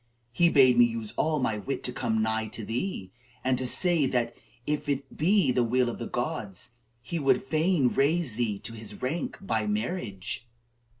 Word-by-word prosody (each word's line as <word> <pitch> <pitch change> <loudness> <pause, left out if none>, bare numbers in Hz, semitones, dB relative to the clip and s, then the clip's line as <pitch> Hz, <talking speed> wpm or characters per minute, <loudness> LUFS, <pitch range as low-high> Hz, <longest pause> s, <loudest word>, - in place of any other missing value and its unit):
He 170 +6 +4
bade 130 -5 +5
me 120 - +9
use 115 -2 -4
all 155 0 +1
my 115 -6 0
wit 135 +5 -4
to 125 - -1
come 110 -4 0
nigh 110 0 0
to 110 0 -6
thee, 115 - -3 0.3
and 130 0 +2
to 130 - -2
say 170 0 +3
that, 120 -2 -1 0.3
if 150 0 -2
it 140 -1 -3
be 185 -1 +3
the 125 -1 +2
will 125 +1 +2
of - - -9
the 115 - -4
gods, 120 - -4 0.3
he 165 +8 -3
would 135 -3 +2
fain 155 0 +2
raise 145 0 +1
thee 110 -3 -1
to 115 - -6
his 110 -2 -7
rank 150 +7 -2
by 195 - -1
marriage." 120 - -3
125 Hz, 185 wpm, -28 LUFS, 115-155 Hz, 0.3 s, me